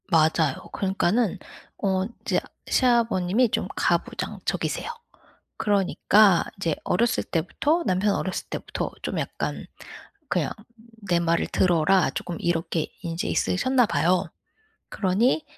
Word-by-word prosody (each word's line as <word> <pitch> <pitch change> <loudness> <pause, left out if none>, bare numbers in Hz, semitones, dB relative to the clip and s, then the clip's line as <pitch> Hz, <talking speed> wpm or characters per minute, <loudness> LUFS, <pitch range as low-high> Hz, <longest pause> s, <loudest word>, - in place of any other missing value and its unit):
맞아요. 160 -4 +3 0.2
그러니까는 195 +2 +1 0.4
어 190 -2 0
인제 230 +5 -2 0.3
시아버님이 235 -3 +2
좀 - - -1
가부장적이세요. - - -1 0.7
그러니까 200 -1 +4
이제 165 -5 -1
어렸을 230 +6 +1
때부터 290 - 0
남편 195 +2 +2
어렸을 185 - -3
때부터 - - -4
좀 - - -2
약간 - - -4 0.6
그냥 - - 0 0.6
"내 175 -1 +3
말을 170 0 +1
들어라." 180 0 +3
쪼끔 175 - -5
이렇게 165 -1 -1 0.2
인제 170 0 -3
있으셨나 255 +6 +2
봐요. 180 -1 +2 0.7
그러니 220 +10 +1
190 Hz, 275 characters per minute, -25 LUFS, 170-220 Hz, 0.7 s, 그러니까